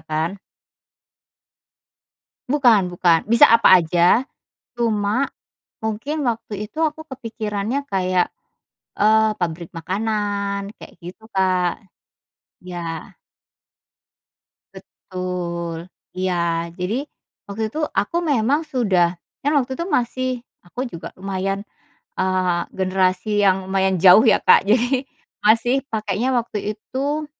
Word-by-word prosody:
kan. 160 Hz, +5 st, -1 dB, 2.1 s
Bukan 240 Hz, -9 st, +4 dB
bukan, 175 Hz, 0 st, +2 dB
bisa 235 Hz, +1 st, +7 dB
apa 230 Hz, -5 st, +7 dB
aja, 175 Hz, +7 st, +3 dB, 0.5 s
cuma 220 Hz, +1 st, +1 dB, 0.5 s
mungkin 245 Hz, +7 st, -3 dB
waktu 220 Hz, -3 st, -3 dB
itu 310 Hz, +10 st, -6 dB
aku 315 Hz, 0 st, -1 dB
kepikirannya 230 Hz, -1 st, -4 dB
kayak, 185 Hz, -5 st, 0 dB, 0.7 s
eee, 215 Hz, 0 st, +3 dB
pabrik 170 Hz, -1 st, -3 dB
makanan 200 Hz, +2 st, -2 dB
kayak -, -, -13 dB
gitu 190 Hz, +7 st, -12 dB
Kak, 185 Hz, -3 st, +1 dB, 0.8 s
iya. 180 Hz, -1 st, -7 dB, 2.0 s
Betul 175 Hz, -2 st, -6 dB, 0.3 s
iya. 170 Hz, -2 st, -1 dB
Jadi, 205 Hz, +10 st, -2 dB, 0.4 s
waktu 200 Hz, +2 st, -4 dB
itu 310 Hz, -, -3 dB
aku 205 Hz, -, -2 dB
memang 285 Hz, -3 st, +1 dB
sudah, 185 Hz, -, +1 dB, 0.2 s
kan 290 Hz, -, 0 dB
waktu 265 Hz, -1 st, +1 dB
itu 335 Hz, -, -2 dB
masih 255 Hz, -3 st, 0 dB, 0.4 s
aku 245 Hz, +9 st, -5 dB
juga 170 Hz, -5 st, -8 dB
lumayan, 195 Hz, +1 st, -3 dB, 0.5 s
eee, 185 Hz, -2 st, +1 dB
generasi 190 Hz, +2 st, 0 dB
yang 190 Hz, -1 st, +2 dB
lumayan 190 Hz, -1 st, +1 dB
jauh 190 Hz, +5 st, +8 dB
ya 225 Hz, -, +4 dB
Kak -, -, +5 dB
jadi, 245 Hz, +5 st, +2 dB, 0.4 s
masih 240 Hz, +5 st, +3 dB
pakainya 215 Hz, +4 st, -1 dB
waktu 220 Hz, -4 st, -2 dB
itu, 285 Hz, +7 st, -3 dB
205 Hz, 105 wpm, -21 LUFS, 185-235 Hz, 2.1 s, jauh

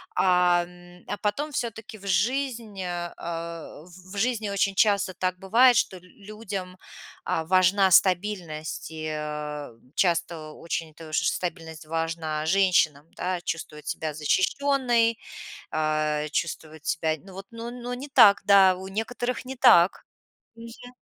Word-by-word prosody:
а, 180 Hz, -1 st, +4 dB
м, 175 Hz, 0 st, -16 dB
а 205 Hz, -, -3 dB
потом 210 Hz, +10 st, -2 dB
всё-таки 225 Hz, -4 st, -5 dB
в 200 Hz, -, -10 dB
жизнь, 230 Hz, -1 st, -1 dB
а 175 Hz, -1 st, -4 dB
а, 165 Hz, -2 st, -6 dB
в 180 Hz, +2 st, -15 dB
в -, -, -7 dB
жизни 220 Hz, -1 st, 0 dB
очень 200 Hz, 0 st, +1 dB
часто 200 Hz, -2 st, +2 dB
так 185 Hz, 0 st, -2 dB
бывает, 240 Hz, +6 st, +5 dB
что 190 Hz, -, 0 dB
л -, -, -15 dB
людям, 195 Hz, -1 st, -8 dB, 0.5 s
а, 160 Hz, -, -1 dB
важна 185 Hz, +2 st, +4 dB
стабильность, 180 Hz, -6 st, +1 dB
и, 155 Hz, 0 st, -5 dB
э, 150 Hz, -1 st, -5 dB, 0.3 s
часто 170 Hz, -3 st, 0 dB
очень 165 Hz, -1 st, -5 dB
тож 155 Hz, -1 st, -5 dB
стабильность 165 Hz, -2 st, -3 dB
важна 160 Hz, -1 st, -2 dB
женщинам, 170 Hz, -6 st, +3 dB
да, 180 Hz, 0 st, -2 dB
чувствовать 155 Hz, -3 st, -6 dB
себя 155 Hz, -1 st, -3 dB
защищенной, 230 Hz, -, +1 dB, 0.5 s
а, 155 Hz, -1 st, 0 dB
чувствовать 160 Hz, -2 st, -4 dB
себя, 160 Hz, -1 st, 0 dB
ну 195 Hz, -, -12 dB
вот, 195 Hz, +1 st, -9 dB
ну, 230 Hz, +1 st, -7 dB
ну, 245 Hz, 0 st, -6 dB
не 265 Hz, +4 st, -7 dB
так, 205 Hz, -7 st, +7 dB
да, 195 Hz, -2 st, +6 dB
у 190 Hz, +1 st, -8 dB
некоторых 240 Hz, +4 st, -3 dB
не 265 Hz, +1 st, -6 dB
так. 240 Hz, -9 st, +7 dB, 0.7 s
Мгм. 230 Hz, +2 st, -11 dB
185 Hz, 140 wpm, -26 LUFS, 165-215 Hz, 0.7 s, так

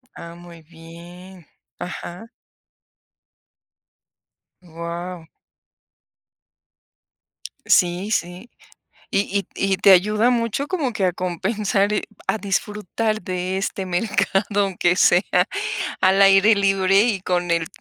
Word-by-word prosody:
Ah, 170 Hz, 0 st, -10 dB
muy 170 Hz, -1 st, -14 dB
bien, 170 Hz, +2 st, -14 dB, 0.3 s
ajá. 180 Hz, +4 st, -8 dB, 2.3 s
Guau. 170 Hz, 0 st, -7 dB, 2.4 s
Sí, 180 Hz, +3 st, +2 dB
sí, 180 Hz, +5 st, -3 dB, 0.6 s
y 195 Hz, -, +1 dB, 0.2 s
y 200 Hz, -, -5 dB
t -, -, -34 dB
y 195 Hz, -1 st, +1 dB
te 195 Hz, +1 st, +5 dB
ayuda 210 Hz, +6 st, +4 dB
mucho 235 Hz, +3 st, -1 dB
como 295 Hz, -10 st, -2 dB
que 200 Hz, -4 st, 0 dB
a 180 Hz, -, +2 dB
compensar, 195 Hz, +3 st, -1 dB
eh, 210 Hz, -, -1 dB, 0.2 s
a -, -, +1 dB
disfrutar 210 Hz, +2 st, -2 dB
de 185 Hz, +1 st, -3 dB
este 195 Hz, 0 st, -3 dB
mercado, 205 Hz, +1 st, 0 dB
aunque 180 Hz, -2 st, 0 dB
sea 180 Hz, 0 st, +4 dB, 0.8 s
al 190 Hz, +1 st, +3 dB
aire 195 Hz, +2 st, +6 dB
libre 195 Hz, -1 st, +3 dB
y 215 Hz, -4 st, 0 dB
con 175 Hz, -2 st, -1 dB
el 165 Hz, -2 st, 0 dB
190 Hz, 110 wpm, -21 LUFS, 175-210 Hz, 2.4 s, aire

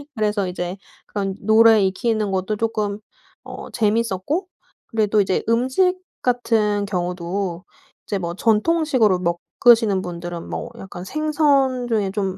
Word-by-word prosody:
그래서 210 Hz, -3 st, 0 dB
이제 180 Hz, +1 st, -4 dB, 0.3 s
그런 195 Hz, -2 st, -3 dB
노래 220 Hz, +1 st, +6 dB
익히는 210 Hz, +2 st, 0 dB
것도 190 Hz, +2 st, -1 dB
쪼끔 210 Hz, -2 st, -2 dB, 0.4 s
어 -, -, -9 dB
재미있었고 230 Hz, -, 0 dB, 0.4 s
그리고 220 Hz, -2 st, 0 dB
또 210 Hz, +1 st, +3 dB
이제 190 Hz, -1 st, 0 dB
음식 260 Hz, +11 st, +2 dB, 0.2 s
같은 220 Hz, -4 st, +1 dB
경우도 180 Hz, -1 st, -3 dB, 0.4 s
이제 200 Hz, -, -2 dB
뭐 170 Hz, -2 st, -4 dB
전통식으로 230 Hz, -, +2 dB, 0.4 s
먹으시는 225 Hz, -5 st, +5 dB
분들은 175 Hz, -1 st, -6 dB
뭐 -, -, -5 dB
약간 180 Hz, -2 st, -8 dB
생선 280 Hz, -1 st, +1 dB
중에 210 Hz, -5 st, 0 dB
좀 195 Hz, -2 st, -2 dB
210 Hz, 280 characters per minute, -21 LUFS, 190-235 Hz, 0.4 s, 노래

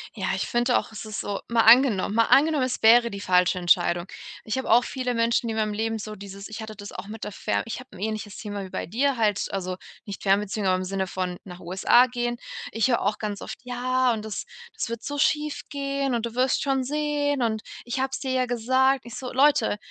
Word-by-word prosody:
Ja, -, -, -3 dB
ich -, -, -2 dB
finde 240 Hz, +1 st, +2 dB
auch, 215 Hz, -, -3 dB
es 220 Hz, 0 st, -8 dB
ist 215 Hz, -1 st, -5 dB
so 200 Hz, -, -3 dB
mal 235 Hz, -1 st, +3 dB
angenommen 225 Hz, -3 st, +5 dB
mal 230 Hz, 0 st, +4 dB
angenommen, 295 Hz, +1 st, +4 dB
es 255 Hz, -1 st, -2 dB
wäre 235 Hz, +1 st, +6 dB
die 200 Hz, -, -6 dB
falsche 180 Hz, -1 st, +3 dB
Entscheidung. 175 Hz, -1 st, +2 dB, 0.4 s
Ich 220 Hz, -, -3 dB
habe 260 Hz, -, -3 dB
auch 240 Hz, +2 st, +6 dB
viele 250 Hz, -1 st, -3 dB
Menschen 230 Hz, 0 st, +1 dB
in 220 Hz, -, -2 dB
meinem 215 Hz, -1 st, 0 dB
Leben 225 Hz, +1 st, -2 dB
so 215 Hz, 0 st, -6 dB
dieses 200 Hz, -1 st, -9 dB
ich 220 Hz, +1 st, -7 dB
hatte 220 Hz, 0 st, -7 dB
das 205 Hz, 0 st, -9 dB
auch -, -, -8 dB
mit 220 Hz, +1 st, -8 dB
der -, -, -4 dB
Fern -, -, -1 dB
ich 230 Hz, -, -5 dB
habe 255 Hz, -, -12 dB
'n -, -, -11 dB
ähnliches 215 Hz, 0 st, -4 dB
Thema 205 Hz, -2 st, -5 dB
wie 190 Hz, -, -8 dB
bei -, -, -4 dB
dir 260 Hz, -, 0 dB
halt 210 Hz, -3 st, +1 dB
also 185 Hz, -2 st, -3 dB, 0.3 s
nicht 200 Hz, -2 st, -7 dB
Fernbeziehung, 200 Hz, +1 st, +1 dB
aber 185 Hz, 0 st, +3 dB
im 185 Hz, -, -3 dB
Sinne 190 Hz, 0 st, -2 dB
von 180 Hz, -1 st, -3 dB
nach 180 Hz, -2 st, -10 dB
USA 190 Hz, +8 st, +4 dB
gehen. 240 Hz, -1 st, -2 dB, 0.3 s
Ich 225 Hz, +1 st, +1 dB
höre 240 Hz, -3 st, +2 dB
auch 205 Hz, +2 st, 0 dB
ganz 205 Hz, -2 st, -4 dB
oft: -, -, -7 dB
„Ja, 250 Hz, 0 st, +1 dB
und 215 Hz, -2 st, -4 dB
das 215 Hz, -, -5 dB, 0.3 s
das 440 Hz, -, -4 dB
wird 230 Hz, 0 st, -5 dB
so 290 Hz, -, -4 dB
schiefgehen 280 Hz, -2 st, -1 dB
und 235 Hz, -, -1 dB
du 235 Hz, 0 st, -6 dB
wirst 255 Hz, +1 st, +2 dB
schon 270 Hz, -2 st, +1 dB
sehen 290 Hz, 0 st, -1 dB
und 220 Hz, -2 st, 0 dB, 0.2 s
ich 240 Hz, +2 st, -3 dB
habe 265 Hz, +1 st, 0 dB
es -, -, -2 dB
dir 265 Hz, -2 st, -3 dB
ja 255 Hz, -1 st, +2 dB
gesagt.” 260 Hz, +3 st, +2 dB
Ich 235 Hz, -2 st, -8 dB
so: 255 Hz, -1 st, -6 dB
„Leute, 265 Hz, -6 st, +3 dB
230 Hz, 240 wpm, -25 LUFS, 205-255 Hz, 0.4 s, wäre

